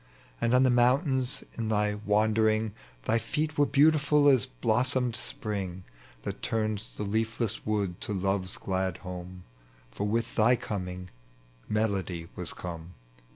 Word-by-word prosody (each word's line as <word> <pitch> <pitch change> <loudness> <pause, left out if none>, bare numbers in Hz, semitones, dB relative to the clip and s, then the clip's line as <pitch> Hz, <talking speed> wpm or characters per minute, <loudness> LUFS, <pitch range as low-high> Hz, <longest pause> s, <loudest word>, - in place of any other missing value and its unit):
And 115 +2 +3
on 130 - +6
the 130 - +4
mountains 130 +1 +2 0.2
in 110 -1 -1
thy 105 -1 +2
wandering 110 +1 +2 0.3
Thy 115 - +2
feet 150 +5 -2
were 145 0 +3
beautiful 150 0 +4
as 130 -6 +4
blossomed 120 - +1
spring, 100 -6 -4 0.4
That - - -5
tui 110 -1 0
ns 110 +1 -4
the - - -6
leafless 110 +2 -1
wood 100 -5 -1
to - - -4
love's 95 -1 -1
glad 95 -1 -1
home. 90 0 -7 0.5
For 100 +12 -2
with 115 +2 -1
thy 115 +3 +5
coming 90 -5 -5 0.6
Melody 95 -6 -1
was - - -3
come. 85 -1 -7
110 Hz, 140 wpm, -29 LUFS, 95-120 Hz, 0.6 s, on